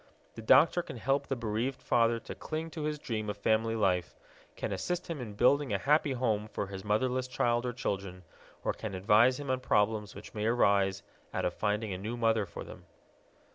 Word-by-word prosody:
The - - -8
doctor 145 +9 +5
can 130 - -8
help 135 +4 0
the 135 - -1
bereaved 115 +3 -2
father 115 0 +2
to - - -7
cling 160 +1 -5
to 160 - -6
his 150 0 -1
dream 110 -6 -4
of 105 - -4
family 110 +2 +1
life, 90 -5 +1 0.4
can - - -3
assist 180 0 -2
him 150 -5 -4
in 105 -4 -7
building 135 +3 +3
a 100 - +2
happy 145 +5 +2
home 110 -4 0
for 105 - -3
his 95 -1 -8
motherless 125 +5 0
child 120 -1 0
or - - -1
children, 95 -6 -4 0.4
or - - 0
can 105 -4 -6
advise 110 +7 +4
him 140 -2 -3
on 130 - 0
problems 105 -3 +1
which - - -10
may 105 0 -1
arise 100 -4 +2 0.3
out - - 0
of 90 - 0
finding 105 0 -1
a 90 - -5
new 110 +5 -4
mother 115 -3 +2
for 85 - -7
them. - - -12
115 Hz, 205 wpm, -31 LUFS, 105-130 Hz, 0.4 s, doctor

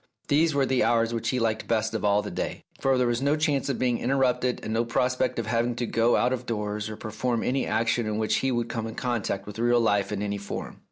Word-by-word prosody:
These 155 +1 +3
were 140 -1 +3
the 130 -1 +2
hours 115 0 +2
which 115 - -1
he 130 - 0
liked 110 -2 -1
best 110 -1 0
of 110 - -2
all 105 0 +3
the 105 - -5
day, - - -4 0.2
for 135 -1 +2
there 125 - +2
was 120 +1 0
no 140 +2 +2
chance 150 -3 0
of 135 - -1
being 125 -2 +1
interrupted 125 -1 +1
and 110 - -3
no 115 +1 +2
prospect 125 +2 0
of 115 - -1
having 115 +1 0
to 120 - -2
go 115 +1 +2
out 125 - +2
of 125 -1 -4
doors 105 -1 -2
or 110 - -7
perform 115 +2 -2
any 130 +2 0
action 115 +1 +1
in 105 0 -1
which 110 0 +1
he 135 - 0
would 120 -1 0
come 115 -1 -3
in 110 - -7
contact 110 -5 -2
with 105 +1 -8
real 120 +1 +3
life 105 -3 +1
in 105 -1 -2
any 100 0 -2
form. 100 - -6
115 Hz, 260 wpm, -26 LUFS, 110-125 Hz, 0.2 s, These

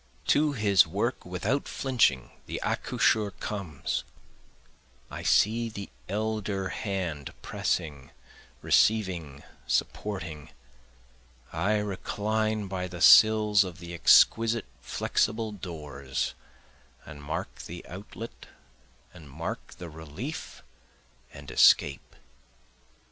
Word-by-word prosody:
To 150 0 +3
his 100 -8 +4
work 105 +6 -2
without 105 +10 -1
flinching 120 - +1 0.2
the - - -4
accoucheur 105 -2 +1
comes, 90 -9 -3 1.1
I - - -6
see 115 +2 +3
the 100 -2 -8 0.2
elder 105 -2 -2
hand 90 -9 -4
pressing 70 -4 -2 0.5
receiving 90 -10 +2 0.2
supporting, 85 -7 -2 1.0
I 95 +7 +1
recline 105 +1 -1
by 90 -1 -3
the 90 -1 -8
sills 105 +2 +7
of 90 -3 -7
the 85 0 -9
exquisite 115 - +5 0.2
flexible 110 - -1
doors, 75 -8 -5 0.7
And 75 -1 -10
mark 75 +2 -4
the 85 +1 -8
outlet, 105 +5 -9 0.7
and 80 -5 -13
mark 80 +5 -6
the 90 - -8
relief 80 -1 -7 0.7
and 70 -1 -10
escape. 70 -1 +4
95 Hz, 95 wpm, -28 LUFS, 80-110 Hz, 1.1 s, sills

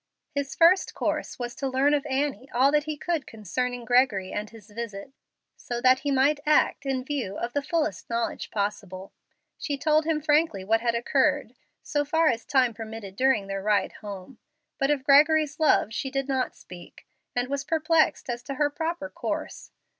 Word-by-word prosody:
His 280 -1 -3
first 345 +3 +4
course - - -2
was 240 -1 -4
to 275 - -2
learn 265 +3 +2
of 295 0 0
Annie 270 -2 -2
all 265 +3 +5
that 300 0 +2
he 305 -1 -4
could 330 -2 -2
concerning 240 +4 -3
Gregory 245 -6 +2
and 210 0 -4
his 220 -2 -15
visit, 225 +2 -7 0.4
so 240 -1 -5
that 255 +1 +5
he 285 - -3
might 280 +2 +3
act 300 -2 +2
in 260 -1 -1
view 260 -9 -3
of 235 +1 -4
the 285 - 0
fullest 315 +1 -2
knowledge 230 0 -2
possible. 200 -2 -4 0.5
She 285 -2 -3
told 310 +2 +2
him 320 -1 +1
frankly 300 - +1
what 225 +3 +2
had 235 -1 0
occurred, 235 - +1 0.3
so 290 -1 0
far 320 +2 +2
as 230 -2 -2
time 255 -4 +2
permitted 220 -3 -8
during 255 -4 +2
their 195 0 -4
ride 205 0 +1
home. 205 +3 -9 0.4
But 275 -1 +1
of 290 -3 +1
Gregory's 300 +1 +4
love 295 -8 +3
she 270 - -3
did 275 0 -2
not 265 -2 -1
speak, 175 -1 -13 0.3
and 245 0 0
was 280 +1 -2
perplexed 320 +1 +1
as 240 -1 -3
to 275 - -5
her 290 +1 +1
proper 320 0 -3
course. - - -5
265 Hz, 185 wpm, -26 LUFS, 225-295 Hz, 0.5 s, all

